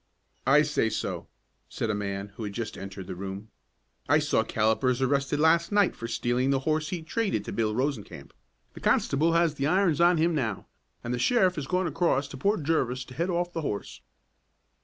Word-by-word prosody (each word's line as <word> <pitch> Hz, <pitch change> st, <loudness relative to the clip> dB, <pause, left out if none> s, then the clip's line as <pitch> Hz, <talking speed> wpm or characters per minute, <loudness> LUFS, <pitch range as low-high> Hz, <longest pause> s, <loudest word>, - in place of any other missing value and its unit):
"I 150 Hz, +3 st, +6 dB
say 150 Hz, -6 st, +1 dB
so," 110 Hz, -, -4 dB, 0.4 s
said 110 Hz, -, -2 dB
a -, -, -1 dB
man 100 Hz, -1 st, -3 dB
who 105 Hz, +3 st, -9 dB
had 105 Hz, -1 st, -4 dB
just 115 Hz, +1 st, -4 dB
entered 95 Hz, 0 st, -8 dB
the -, -, -6 dB
room. 100 Hz, +3 st, -7 dB, 0.6 s
"I -, -, +6 dB
saw -, -, +2 dB
Callipers 110 Hz, +4 st, +1 dB
arrested 140 Hz, +2 st, +1 dB
last 165 Hz, +3 st, +3 dB
night 205 Hz, -2 st, +3 dB
for 115 Hz, -, -6 dB
stealing 120 Hz, +2 st, 0 dB
the 135 Hz, -1 st, +2 dB
horse 155 Hz, +1 st, 0 dB
he 175 Hz, -3 st, -4 dB
traded 200 Hz, +6 st, -1 dB
to -, -, -5 dB
Bill 110 Hz, -2 st, 0 dB
Rosencamp. 130 Hz, -4 st, -3 dB, 0.4 s
The -, -, -10 dB
constable 160 Hz, +4 st, +2 dB
has 170 Hz, -2 st, +3 dB
the 140 Hz, -1 st, -1 dB
irons 175 Hz, -3 st, +2 dB
on 175 Hz, 0 st, +5 dB
him 165 Hz, +2 st, +2 dB
now, 115 Hz, -10 st, -2 dB, 0.4 s
and 120 Hz, -, -3 dB
the 120 Hz, -, -2 dB
sheriff 190 Hz, -, +3 dB
has 150 Hz, -6 st, -5 dB
gone 185 Hz, +3 st, 0 dB
across 150 Hz, -4 st, +1 dB
to 135 Hz, -, -8 dB
Port 200 Hz, +3 st, 0 dB
Jervis 130 Hz, -5 st, 0 dB
to -, -, -10 dB
head 170 Hz, +7 st, -1 dB
off 175 Hz, 0 st, -1 dB
the 165 Hz, -, -2 dB
horse." 105 Hz, -9 st, -5 dB
140 Hz, 200 wpm, -27 LUFS, 115-170 Hz, 0.6 s, I